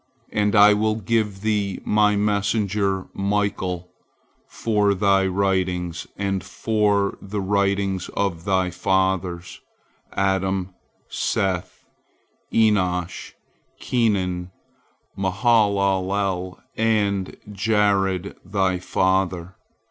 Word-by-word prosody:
And 105 Hz, +1 st, +1 dB
I 105 Hz, 0 st, +8 dB
will 110 Hz, +1 st, +1 dB
give 110 Hz, -2 st, -1 dB
thee 105 Hz, -3 st, -1 dB
My 105 Hz, 0 st, +3 dB
messenger 100 Hz, -1 st, 0 dB
Michael 95 Hz, -3 st, -2 dB, 0.6 s
for 105 Hz, -3 st, +1 dB
thy 95 Hz, 0 st, +3 dB
writings 90 Hz, -3 st, -1 dB
and 95 Hz, -1 st, -1 dB
for 105 Hz, -3 st, 0 dB
the 100 Hz, +1 st, -4 dB
writings 100 Hz, -1 st, 0 dB
of 90 Hz, -5 st, -1 dB
thy 95 Hz, -2 st, +1 dB
fathers, 95 Hz, -2 st, -1 dB, 0.5 s
Adam, 95 Hz, -1 st, 0 dB, 0.3 s
Seth, 95 Hz, -2 st, -2 dB, 0.7 s
Enosh, 95 Hz, -5 st, +1 dB, 0.5 s
Kenan, 95 Hz, -7 st, 0 dB, 0.7 s
Mahalalel, 95 Hz, -2 st, +1 dB, 0.2 s
and 105 Hz, -4 st, 0 dB, 0.2 s
Jared 100 Hz, -2 st, +1 dB
thy 95 Hz, -1 st, 0 dB
father. 95 Hz, -1 st, 0 dB
100 Hz, 80 wpm, -23 LUFS, 95-105 Hz, 0.7 s, I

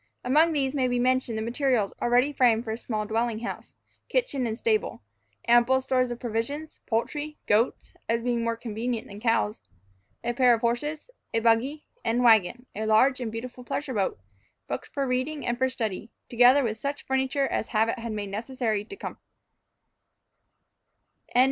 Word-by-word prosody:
Among 305 Hz, +6 st, +4 dB
these 275 Hz, -3 st, 0 dB
may 265 Hz, -3 st, +1 dB
be 245 Hz, 0 st, 0 dB
mentioned 250 Hz, -2 st, +1 dB
the 220 Hz, -, -2 dB
materials 240 Hz, -3 st, 0 dB
already 245 Hz, +4 st, +3 dB
framed 235 Hz, -4 st, +3 dB
for 220 Hz, -, -4 dB
a 220 Hz, -, -3 dB
small 215 Hz, -3 st, -3 dB
dwelling 225 Hz, +1 st, -1 dB
house, 240 Hz, -, -6 dB, 0.3 s
kitchen, 290 Hz, -, 0 dB
and 220 Hz, 0 st, -3 dB
stable; 435 Hz, -, 0 dB, 0.4 s
ample 240 Hz, +2 st, +5 dB
stores 255 Hz, -1 st, +1 dB
of 240 Hz, 0 st, -5 dB
provisions, 250 Hz, +7 st, -4 dB
poultry, 295 Hz, +7 st, -2 dB
goats 225 Hz, +4 st, +1 dB, 0.2 s
(as 230 Hz, 0 st, +1 dB
being 240 Hz, -1 st, 0 dB
more 230 Hz, 0 st, -1 dB
convenient 230 Hz, 0 st, -3 dB
than 200 Hz, 0 st, -10 dB
cows), 160 Hz, -, +1 dB, 0.6 s
a 240 Hz, 0 st, -1 dB
pair 245 Hz, -1 st, +5 dB
of 225 Hz, -, -7 dB
horses, 295 Hz, -, -2 dB, 0.2 s
a -, -, +4 dB
buggy, 235 Hz, +6 st, +1 dB, 0.2 s
and 235 Hz, +2 st, +1 dB
wagon, 230 Hz, +1 st, +4 dB
a 215 Hz, +2 st, -2 dB
large 255 Hz, +5 st, +4 dB
and 235 Hz, -3 st, -3 dB
beautiful 245 Hz, +2 st, -7 dB
pleasure 265 Hz, +2 st, -3 dB
boat, 195 Hz, -, -1 dB, 0.5 s
books 125 Hz, -, -4 dB
for 280 Hz, -1 st, -2 dB
reading, 260 Hz, +4 st, -1 dB
and 240 Hz, 0 st, -1 dB
for 260 Hz, 0 st, +2 dB
study, 220 Hz, -4 st, -4 dB, 0.2 s
together 250 Hz, +4 st, +6 dB
with 225 Hz, -2 st, -2 dB
such 280 Hz, +3 st, -4 dB
furniture 265 Hz, +1 st, +1 dB
as 220 Hz, -, -2 dB
habit 225 Hz, +2 st, +1 dB
had 230 Hz, 0 st, -4 dB
made 205 Hz, -2 st, -4 dB
necessary 225 Hz, -1 st, -2 dB
to 220 Hz, -, -10 dB
comfort. -, -, -7 dB
240 Hz, 165 wpm, -27 LUFS, 225-265 Hz, 0.6 s, together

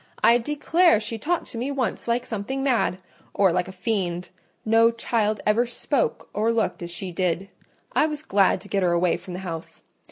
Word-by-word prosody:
I 235 Hz, +1 st, +6 dB
declare 295 Hz, -, +3 dB
she 220 Hz, +1 st, -4 dB
talked 345 Hz, +8 st, -1 dB
to 230 Hz, -, -5 dB
me 255 Hz, +4 st, -2 dB
once 270 Hz, -5 st, -2 dB
like 235 Hz, +1 st, 0 dB
something 245 Hz, +5 st, -3 dB
mad, 245 Hz, -8 st, +1 dB, 0.4 s
or 195 Hz, -3 st, +4 dB
like 175 Hz, -, 0 dB
a -, -, -7 dB
fiend—no 185 Hz, +3 st, 0 dB
child 225 Hz, -2 st, -1 dB
ever 225 Hz, +3 st, +3 dB
spoke 245 Hz, +3 st, -1 dB
or 220 Hz, +2 st, +1 dB
looked 230 Hz, -4 st, -1 dB
as 170 Hz, -, -5 dB
she 180 Hz, +2 st, -5 dB
did; 180 Hz, +2 st, -1 dB, 0.4 s
I 310 Hz, -, +3 dB
was 300 Hz, -1 st, -5 dB
glad 200 Hz, -9 st, +3 dB
to -, -, -12 dB
get 200 Hz, -1 st, 0 dB
her 175 Hz, -2 st, +2 dB
away 175 Hz, 0 st, +2 dB
from 180 Hz, -, -9 dB
the 185 Hz, -, -6 dB
house. 165 Hz, -2 st, -7 dB
215 Hz, 190 wpm, -24 LUFS, 185-240 Hz, 0.4 s, I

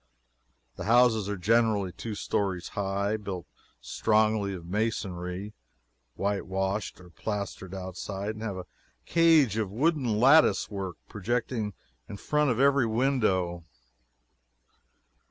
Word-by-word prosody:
The -, -, -5 dB
houses 115 Hz, -2 st, +4 dB
are 100 Hz, -, -2 dB
generally 105 Hz, -1 st, +2 dB
two 110 Hz, +4 st, -6 dB
stories 95 Hz, -3 st, -2 dB
high, 100 Hz, +1 st, -1 dB
built 95 Hz, -4 st, -6 dB, 0.3 s
strongly 110 Hz, -, +1 dB
of 85 Hz, -2 st, -9 dB
masonry, 95 Hz, -1 st, -3 dB, 0.6 s
whitewashed 95 Hz, 0 st, -2 dB
or 90 Hz, -1 st, -15 dB
plastered 100 Hz, -1 st, -5 dB
outside, 95 Hz, +2 st, -5 dB
and 110 Hz, 0 st, -9 dB
have 105 Hz, -4 st, -3 dB
a 90 Hz, -, -6 dB, 0.4 s
cage 160 Hz, -, +4 dB
of 110 Hz, -3 st, -1 dB
wooden 125 Hz, -, +1 dB
lattice 130 Hz, -7 st, +5 dB
work 95 Hz, -4 st, -4 dB
projecting 110 Hz, 0 st, -2 dB, 0.4 s
in 100 Hz, -, -6 dB
front 150 Hz, +6 st, +1 dB
of 120 Hz, -1 st, 0 dB
every 140 Hz, -3 st, +4 dB
window. 110 Hz, -8 st, +1 dB
105 Hz, 115 wpm, -28 LUFS, 95-115 Hz, 0.6 s, lattice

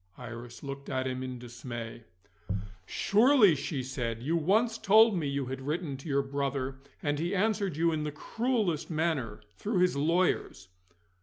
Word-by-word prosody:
Iris 120 Hz, 0 st, -9 dB
looked 140 Hz, 0 st, -6 dB
at 130 Hz, -1 st, -1 dB
him 130 Hz, 0 st, -2 dB
in 130 Hz, -1 st, -4 dB
dismay. 120 Hz, -1 st, -7 dB, 0.8 s
"Surely," 220 Hz, -, +5 dB
she 140 Hz, -1 st, -3 dB
said, 120 Hz, -3 st, -3 dB
"you 160 Hz, +5 st, +1 dB
once 220 Hz, +8 st, +2 dB
told 220 Hz, +1 st, +6 dB
me 160 Hz, -5 st, -1 dB
you 140 Hz, -1 st, -1 dB
had 135 Hz, +1 st, -5 dB
written 150 Hz, +1 st, -2 dB
to 140 Hz, +4 st, -9 dB
your 140 Hz, 0 st, +2 dB
brother, 135 Hz, -1 st, -2 dB, 0.2 s
and 145 Hz, 0 st, 0 dB
he 175 Hz, +5 st, -1 dB
answered 200 Hz, -4 st, +1 dB
you 165 Hz, +1 st, +3 dB
in 155 Hz, -1 st, -1 dB
the 150 Hz, -, -2 dB
cruellest 215 Hz, -, -1 dB
manner 155 Hz, -10 st, -1 dB, 0.2 s
through 210 Hz, -1 st, -1 dB
his 180 Hz, -2 st, +3 dB
lawyers." 165 Hz, -, +1 dB
145 Hz, 160 wpm, -30 LUFS, 130-180 Hz, 0.8 s, told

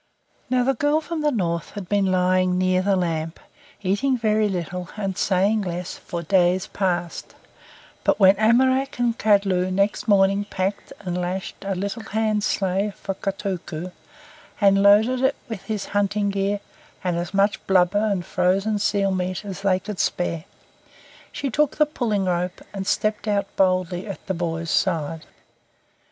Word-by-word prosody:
Now 250 Hz, 0 st, +2 dB
the 270 Hz, +2 st, +2 dB
girl 290 Hz, +4 st, +2 dB
from 320 Hz, 0 st, -4 dB
the 300 Hz, -, +2 dB
North 170 Hz, -8 st, -2 dB
had 200 Hz, -3 st, -6 dB
been 200 Hz, 0 st, +2 dB
lying 185 Hz, 0 st, +2 dB
near 185 Hz, 0 st, +2 dB
the 195 Hz, +1 st, +2 dB
lamp, 165 Hz, -3 st, -2 dB, 0.4 s
eating 250 Hz, +8 st, +1 dB
very 215 Hz, -2 st, +2 dB
little 180 Hz, -1 st, -4 dB
and 195 Hz, -3 st, -2 dB
saying 200 Hz, +4 st, +2 dB
less 180 Hz, -1 st, -4 dB
for 170 Hz, -1 st, -6 dB
days 180 Hz, +1 st, +2 dB
past; 175 Hz, -3 st, -3 dB, 0.7 s
but -, -, +2 dB
when 190 Hz, -1 st, +7 dB
Amoraq 260 Hz, +5 st, +3 dB
and 240 Hz, -1 st, +1 dB
Kadlu 195 Hz, -4 st, +2 dB
next 200 Hz, +2 st, 0 dB
morning 195 Hz, 0 st, +3 dB
packed 195 Hz, 0 st, -3 dB
and 180 Hz, -3 st, -3 dB
lashed 185 Hz, +2 st, -4 dB
a 195 Hz, -1 st, -2 dB
little 200 Hz, +5 st, -3 dB
hand 215 Hz, -1 st, -1 dB
sleigh 195 Hz, +1 st, 0 dB
for 195 Hz, -, -4 dB
Kotuko, 185 Hz, -3 st, -4 dB, 0.7 s
and 195 Hz, -2 st, +4 dB
loaded 220 Hz, +6 st, +5 dB
it 265 Hz, +1 st, +2 dB
with 225 Hz, -5 st, -6 dB
his 210 Hz, -3 st, -3 dB
hunting 205 Hz, 0 st, +1 dB
gear 200 Hz, +1 st, -1 dB, 0.4 s
and 180 Hz, -2 st, 0 dB
as 175 Hz, 0 st, -3 dB
much 200 Hz, +2 st, +1 dB
blubber 190 Hz, +2 st, +3 dB
and 200 Hz, -5 st, 0 dB
frozen 195 Hz, +4 st, +1 dB
seal 200 Hz, -1 st, +1 dB
meat 185 Hz, +1 st, -2 dB
as 195 Hz, -1 st, -6 dB
they 190 Hz, -2 st, +2 dB
could 200 Hz, 0 st, -7 dB
spare, 170 Hz, -2 st, -1 dB, 0.9 s
she 280 Hz, -2 st, -3 dB
took 295 Hz, +4 st, +1 dB
the 300 Hz, -, +5 dB
pulling 225 Hz, -9 st, -1 dB
rope, 180 Hz, 0 st, -1 dB
and 195 Hz, -1 st, -5 dB
stepped 215 Hz, 0 st, 0 dB
out 200 Hz, -1 st, -1 dB
boldly 185 Hz, 0 st, +1 dB
at 200 Hz, -, -7 dB
the 195 Hz, -, -2 dB
boy's 165 Hz, -1 st, -3 dB
side. 160 Hz, -3 st, 0 dB
195 Hz, 160 wpm, -23 LUFS, 180-210 Hz, 0.9 s, when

